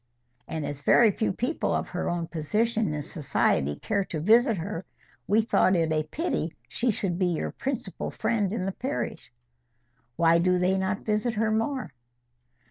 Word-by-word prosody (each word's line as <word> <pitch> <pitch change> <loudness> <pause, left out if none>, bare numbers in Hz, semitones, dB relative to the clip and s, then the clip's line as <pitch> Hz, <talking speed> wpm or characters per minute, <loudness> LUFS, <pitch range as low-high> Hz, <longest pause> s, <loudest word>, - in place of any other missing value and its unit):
And 160 -2 -3
as 145 0 -5
very 220 +8 +5
few 220 - 0
people 245 - -1
of - - -2
her - - -2
own 175 -1 -1
position 215 +7 0
in 150 -1 -3
society 130 - 0
care 200 - -1
to 160 - -4
visit 225 - +4
her, 175 +1 -4 0.4
we 215 +2 +4
thought 195 -4 +3
it 165 -2 +1
a 155 -1 +2
pity 310 - -3
she 245 - -1
should 190 -4 -1
be 185 - +3
your 170 -3 -1
principal 255 -8 -4
friend 210 -5 0
in 195 -4 -2
the 195 - -1
parish." 265 +8 -4 0.8
"Why 170 0 +4
do 180 +1 +3
they 180 +1 +2
not 190 +2 -2
visit 215 +2 0
her 220 0 +1
more?" 225 - -1
195 Hz, 170 wpm, -27 LUFS, 165-225 Hz, 0.8 s, very